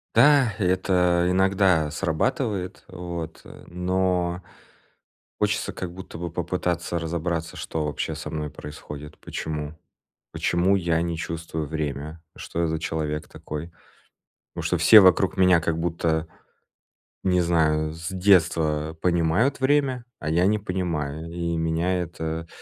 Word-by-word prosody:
Да, 140 -7 +6
и 105 - -1
это 90 -1 +2
иногда 95 -4 +3
срабатывает, 95 - -1
вот, 85 -3 -6
э, - - -13
но 90 0 0 1.0
хочется - - 0
как 90 -2 -5
будто 90 -2 -9
бы 85 -1 -4
попытаться 85 0 -2
разобраться, 80 0 -3
что 80 -1 -3
вообще 75 - -3
со - - -6
мной 75 -1 -3
происходит. 75 +1 -9
Почему? 75 -1 -5 0.6
Почему 90 +3 +2
я 85 -3 +1
не 85 -1 -2
чувствую 80 -1 -4
время, 75 +1 -4
что 85 - -5
я 85 - +1
за 80 0 -1
человек 75 -1 -3
такой? 75 +3 -7 0.8
Потому - - -5
что - - +1
все 110 - +9
вокруг 95 0 +4
меня 90 -2 +5
как 80 0 -1
будто 80 -1 0 1.0
не 90 -1 +3
знаю- 80 -2 +2
с 80 +2 -6
детства 80 -5 +2
понимают 90 - +2
время, 130 -3 +2
а 80 - -3
я 90 +3 +3
не 105 - +3
понимаю, 85 -5 -3
и 85 -1 -2
меня 85 +3 0
это 80 -1 -4
85 Hz, 135 wpm, -25 LUFS, 80-90 Hz, 1.0 s, все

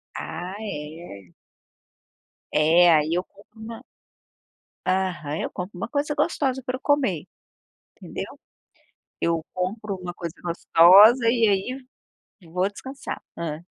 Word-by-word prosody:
Ah, 175 +4 -6
é. 150 - -8 1.2
É, 170 +3 +5
aí 155 +1 +1
eu 180 +1 0
compro 210 +3 -21
uma 225 +1 -8 1.0
Aham, 180 -5 -1
eu - - -3
compro 180 +1 -6
uma 185 - -3
coisa 290 +1 -1
gostosa 275 -4 0
pra 255 - -2
eu - - -22
comer, 260 - +1 0.7
entendeu? - - -7 0.8
Eu 165 -1 +1
compro 200 +3 -3
uma 180 -1 -7
coisa 170 -2 -6
gostosa 185 +7 +6
e, 230 -1 +3
aí, 245 +7 -1 0.7
vou 180 +3 +1
descansar. 265 +7 -8
Hã? 165 0 -5
185 Hz, 115 wpm, -24 LUFS, 170-230 Hz, 1.2 s, gostosa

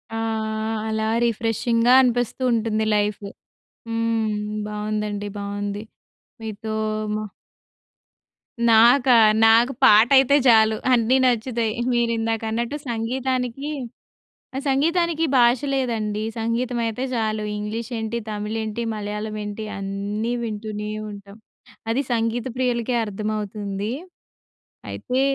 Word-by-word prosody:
ఆ! - - -2 0.7
అలా 220 0 -1 0.2
రిఫ్రెషింగ్‌గా 230 +1 +1
అనిపిస్తూ 245 -1 0
ఉంటుంది 220 -1 0
లైఫ్. 205 0 0 0.6
హ్మ్. 230 -1 0 0.3
బావుందండి, 210 -1 -3
బావుంది. 205 0 -4 0.6
మీతో 220 0 -5 0.4
మా 215 - -3 1.5
నాకా? 245 +3 +6 0.3
నాకు 230 +4 +5
పాట 220 -2 +7
అయితే 270 +1 +5
చాలు 220 -2 +6 0.2
అన్నీ 240 +2 +3
నచ్చుతాయి. 235 -2 0 0.2
మీరు 235 -1 +1
ఇందాక 225 0 -1
అన్నట్టు 235 +5 -2
సంగీతానికి 250 +3 -2 0.9
ఆ! - - -1
సంగీతానికి 330 +4 +1
భాష 240 0 +5
లేదండి! 220 -5 -1 0.2
సంగీతం 235 +2 -1
అయితే 225 +3 -3
చాలు. 215 -2 -1
ఇంగ్లీష్ 220 +3 -5
ఏంటి, 220 +1 -3
తమిళ్, 210 +1 -3
ఏంటి 220 +2 -3
మలయాళం 210 +1 -4
ఏంటి 210 +1 -5
అన్నీ 200 +3 -3
వింటూనే 210 -1 -4 0.2
ఉంటాం. 200 0 -11 0.5
అది 250 +4 +1
సంగీత 230 +1 -1
ప్రియులకే 245 -1 0
అర్థమవుతుంది. 210 0 -4 1.0
అయితే 255 0 -2
225 Hz, 100 wpm, -23 LUFS, 210-240 Hz, 1.5 s, పాట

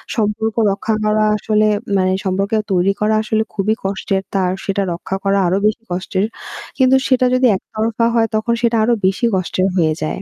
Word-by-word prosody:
সম্পর্ক 220 0 -1 0.2
রক্ষা 215 +2 -1
করা 215 0 +2
আসলে 215 0 +1 0.3
মানে 185 0 +1
সম্পর্কেও 195 +3 0
তৈরি 185 +2 +2
করা 215 +1 +2
আসলে 220 0 0
খুবই 215 +1 0
কষ্টের। 195 0 -1
তার 185 -2 +1
সেটা 200 0 0
রক্ষা 175 +2 -5
করা 195 0 +2
আরও 180 +2 +1
বেশি 220 +2 -2
কষ্টের। 185 +2 -1 0.5
কিন্তু 260 0 +4
সেটা 255 -1 +3
যদি 255 0 +4
এক 190 - -5
তরফা 225 +1 0
হয় 225 -1 +3
তখন 220 +2 0
সেটা 235 -1 +2
আরও 240 +2 +2
বেশি 195 +6 0
কষ্টের 185 0 0
হয়ে 155 -3 +2
যায়। 155 - -3
210 Hz, 180 wpm, -18 LUFS, 190-220 Hz, 0.5 s, কিন্তু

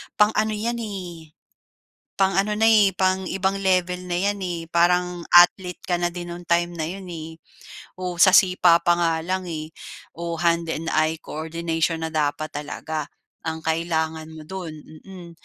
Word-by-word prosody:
pang-ano 215 +1 +2
'yan, 235 +3 -2
eh, 175 -8 -7 0.8
pang-ano 195 +2 +1
na, 220 - +2
eh, 210 -4 +5
pang 185 0 +1
ibang 195 +1 -1
level 180 -1 +1
na 175 - -1
'yan 200 +2 0
eh. 175 -3 -4
Parang, 180 +1 +2 0.2
athlete 180 +1 +5
ka 175 -1 -1
na 175 - +1
din 175 -1 -6
nong 175 0 -10
time 175 0 +2
na 160 -2 -3
'yon, 190 +2 -7
eh. 160 0 -8 0.6
O, 180 -1 -4
sa 185 +2 +6
sipa 180 -3 +5
pa 175 - +4
nga 165 -1 +2
lang 185 +1 -2
eh, 155 -2 -5 0.5
o, 170 0 -3
hand 170 0 +1
and 165 +1 -3
eye 155 +1 +2
coordination 165 +1 -2
na 160 - -2
dapat 155 0 -1
talaga, 150 +1 -5 0.4
ang 160 0 -3
kailangan 160 -1 -2
mo 155 - -10
do'n, 170 -1 -7 0.3
mm. 180 -3 -10
175 Hz, 165 wpm, -23 LUFS, 160-190 Hz, 0.8 s, sa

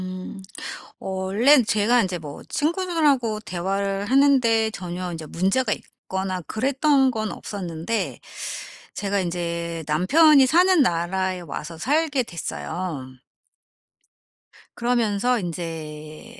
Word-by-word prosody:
음. 185 +1 -7 0.6
어 - - -8
원래는 205 +9 +4
제가 215 +4 +3
인제 185 -3 -1
뭐 145 -3 -8
친구들하고 300 - +1
대화를 195 +1 -2
하는 275 +3 +5
데 225 -2 +2
전혀 180 -2 -5
인제 160 -2 -7
문제가 195 - +1
있거나 190 -1 -5
그랬던 270 - +2
건 215 -3 -3
없었는데 180 +1 -4 0.8
제가 200 0 -1
인제 170 -1 -3
남편이 270 - +5
사는 355 +3 +5
나라에 185 -2 0
와서 165 0 -7
살게 290 - +1
됐어요. 170 - -5 1.7
그러면서 240 0 +1
인제 155 -4 -7
195 Hz, 235 characters per minute, -23 LUFS, 175-255 Hz, 1.7 s, 하는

